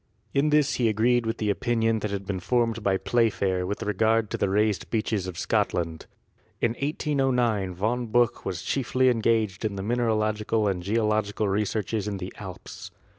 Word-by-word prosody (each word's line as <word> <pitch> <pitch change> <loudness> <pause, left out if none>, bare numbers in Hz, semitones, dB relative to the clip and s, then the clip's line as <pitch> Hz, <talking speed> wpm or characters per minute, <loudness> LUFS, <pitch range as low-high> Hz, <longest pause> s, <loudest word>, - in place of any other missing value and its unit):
In 140 +2 +2
this 150 -1 +3
he 115 - +4
agreed 115 +2 +2
with 115 - -1
the 105 -2 0
opinion 115 0 +1
that 105 - -3
had 100 -1 -4
been 95 -1 -3
formed 115 +2 0
by 100 -2 +2
Playfair 95 -6 +1
with 100 - -3
regard 110 +1 +1
to - - -1
the 100 - +1
raised 105 0 +1
beaches 110 -4 -1
of 90 -3 -6
Scotland. 80 -2 -1 0.5
In 120 - +2
1809 125 - 0
Von 115 +6 -1
Buch 120 +1 +2
was - - -4
chiefly 130 -1 +1
engaged 110 -4 +1
in 105 -2 -1
mineralogical 110 0 0
and 95 -3 -1
geological 105 +1 0
researches 105 +1 -1
in 100 -1 -2
the 95 0 -6
Alps. - - -9
110 Hz, 165 wpm, -26 LUFS, 100-120 Hz, 0.5 s, he